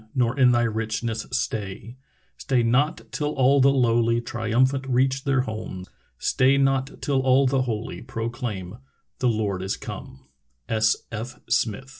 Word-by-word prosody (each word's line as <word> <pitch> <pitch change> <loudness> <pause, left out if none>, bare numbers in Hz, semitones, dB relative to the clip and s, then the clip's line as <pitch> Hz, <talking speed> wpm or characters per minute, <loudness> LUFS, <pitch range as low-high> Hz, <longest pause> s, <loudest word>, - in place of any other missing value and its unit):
Nor 125 -1 +1
in 125 -2 +6
thy 120 -1 +3
richness 110 0 -2
stay; 105 +3 -3 0.4
Stay 125 -3 0
not 130 +7 +1
till 150 -1 -2
all 135 +1 +4
the 135 - +6
lowly 120 -3 +2
Triumphant 120 +4 0
reach 130 +2 +1
their 135 -2 +2
home; 110 -5 -6 0.3
Stay 130 +2 +3
not 135 -1 +1
till 140 -2 +1
all 130 +1 +4
the 130 0 +2
holy 115 -3 -4
Proclaim 115 -4 -5 0.2
— - - -47
The 125 - +2
Lord 105 -4 -1
is 95 +1 -2
come 65 - -8
120 Hz, 135 wpm, -24 LUFS, 110-135 Hz, 0.4 s, in